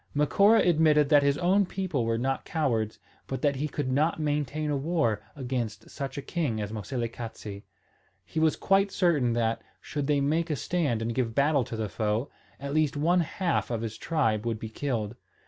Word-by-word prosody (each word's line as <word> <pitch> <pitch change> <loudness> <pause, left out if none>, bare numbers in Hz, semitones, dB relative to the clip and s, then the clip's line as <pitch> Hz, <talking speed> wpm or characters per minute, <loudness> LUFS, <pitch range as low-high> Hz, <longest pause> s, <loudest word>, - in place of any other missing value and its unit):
Macora 200 +10 +5
admitted 155 -3 +4
that 145 -2 +6
his 140 0 +2
own 190 +3 +3
people 180 -12 -2
were 115 0 +1
not 135 +2 -1
cowards, 115 -9 -1 0.3
but 135 - -4
that 140 -2 +2
he 150 +3 -1
could 145 -3 -3
not 155 +5 +1
maintain 150 0 -1
a - - +1
war 140 -7 0
against 120 -5 -4
such 140 0 -5
a 140 - -4
king 145 -11 -1
as 105 -1 -3
Moselekatse. 115 -2 -5 0.6
He - - -3
was 160 -1 +3
quite 195 +1 +3
certain 160 -11 +2
that, 115 -1 0 0.2
should 145 -2 -4
they 145 -1 +3
make 160 +4 +1
a 150 - +1
stand 145 -7 -1
and 115 +1 -2
give 115 -2 -1
battle 140 -1 +3
to 115 - -6
the 110 -1 -2
foe, 110 +5 -1 0.3
at 140 0 -4
least 155 -2 +1
one 170 +5 +3
half 175 +1 -1
of 115 -2 -2
his 110 -1 -4
tribe 115 -11 0
would 115 -2 -1
be 110 0 -6
killed. 115 -3 -3
140 Hz, 190 wpm, -28 LUFS, 115-155 Hz, 0.6 s, that